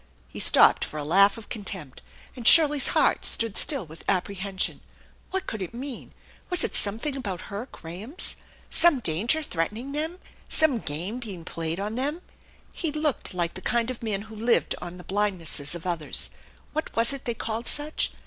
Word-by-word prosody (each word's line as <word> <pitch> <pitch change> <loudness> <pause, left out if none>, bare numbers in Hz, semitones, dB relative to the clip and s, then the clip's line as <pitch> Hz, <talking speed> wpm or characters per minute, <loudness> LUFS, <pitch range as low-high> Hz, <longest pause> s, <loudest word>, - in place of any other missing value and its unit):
He - - -9
stopped - - +6
for 155 - -5
a 150 - -3
laugh 195 +7 +5
of 225 - -10
con 215 -4 -6
tempt, 170 -9 -7 0.3
and 245 -3 -1
Shirley's 295 -4 +7
heart - - +3
stood 230 -3 +2
still 275 - +3
with 160 +1 -13
apprehension. 195 0 -1 0.5
What 380 0 -2
could 220 - -4
it 185 +5 -5
mean? 265 +1 -7 0.4
Was 360 -3 +4
it - - -1
something 225 +8 +1
about 200 -9 -5
her 215 +6 -4
Grahams? 195 - -3 0.4
Some 330 -5 +6
danger 225 - +1
threatening 215 - -3
them? 315 +4 -2 0.3
Some 300 -7 +3
game 180 +9 -2
being 195 -9 -7
played 165 0 -3
on 205 +2 -3
them? 290 +8 -2 0.5
He 325 -3 -2
looked 300 -9 -1
like 175 -1 0
the 185 - -8
kind 235 +3 +1
of 250 - -9
man 210 -3 -2
who 220 0 -12
lived 230 +3 +2
on 175 +1 -7
the 180 - -11
blindnesses 180 -7 -2
of 170 - -8
others. 170 -4 0 0.4
What 310 +1 -3
was 230 +4 +3
it 275 - -6
they 235 - -1
called 225 +2 -3
such? 295 +1 0
220 Hz, 180 wpm, -26 LUFS, 180-270 Hz, 0.5 s, Shirley's